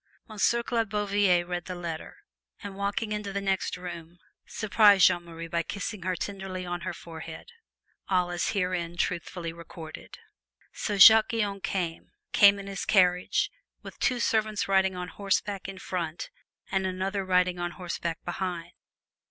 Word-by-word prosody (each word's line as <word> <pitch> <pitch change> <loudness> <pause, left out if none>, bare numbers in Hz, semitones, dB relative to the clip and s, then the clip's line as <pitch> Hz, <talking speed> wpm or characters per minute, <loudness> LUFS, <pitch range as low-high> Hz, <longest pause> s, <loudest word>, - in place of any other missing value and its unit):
Monsieur 230 +2 +1
Claude 230 -3 -1
Bouvier 200 -3 +2
read 175 -1 -4
the 180 - -5
letter, 170 -2 -6 0.5
and 200 -1 -6
walking 200 +2 -2
into 210 -1 -3
the 200 - -2
next 195 -2 -1
room, 175 -1 -8 0.3
surprised 205 -3 +5
Jeanne 175 0 +3
Marie 165 0 -8
by 170 0 0
kissing 200 +3 -5
her 185 +1 -1
tenderly 190 -1 -5
on 175 0 -4
her 185 - -3
forehead 160 - -9 0.6
all 180 -2 +2
as 175 -1 -1
herein 180 -3 -1
truthfully 170 -1 -2
recorded. 165 -1 -10 0.6
So 205 - -2
Jacques 220 +3 +9
Guyon 205 -4 -1
came, 175 -4 -3 0.2
came 200 -1 +7
in 200 - -7
his 195 -1 -4
carriage, 180 -3 +3 0.3
with - - -11
two 250 -1 +1
servants 215 -2 +1
riding 190 -1 +3
on 180 0 -4
horseback 195 +2 -2
in 195 - -8
front 170 -3 -4 0.4
and 190 0 +1
another 190 +2 -2
riding 180 -1 +2
on 175 0 -1
horseback 170 -2 -4
behind. 175 -1 -4
185 Hz, 150 wpm, -28 LUFS, 175-200 Hz, 0.6 s, Jacques